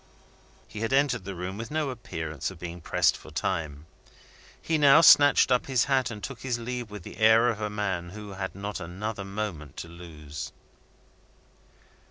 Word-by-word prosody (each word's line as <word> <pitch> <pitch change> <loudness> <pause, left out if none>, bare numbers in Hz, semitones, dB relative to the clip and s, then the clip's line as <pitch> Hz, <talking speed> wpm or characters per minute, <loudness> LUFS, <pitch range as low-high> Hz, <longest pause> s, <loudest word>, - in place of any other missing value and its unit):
He 105 - -8
had 115 +3 -1
entered 135 -7 +2
the 100 -1 -5
room 90 +3 -5
with 115 - -5
no 150 -3 -1
appearance 80 - -5
of 95 - -11
being 85 +1 -7
pressed - - +2
for - - -12
time. 75 -2 -3 0.7
He 160 -1 0
now 145 +2 +7
snatched 145 -4 +7
up 125 - +2
his 130 -4 +2
hat, 130 -3 +1
and 105 -3 -8
took 135 -3 -6
his 125 -3 -1
leave 120 -1 -5
with 105 -3 -9
the - - -10
air 110 +2 +5
of 110 -2 -3
a 105 - -1
man 95 -4 -2
who 105 +2 -9
had 95 -1 -5
not 100 +1 -5
another 95 +4 -5
moment 95 -8 -5
to - - -6
lose. 80 -3 -9
105 Hz, 180 wpm, -27 LUFS, 85-120 Hz, 0.7 s, now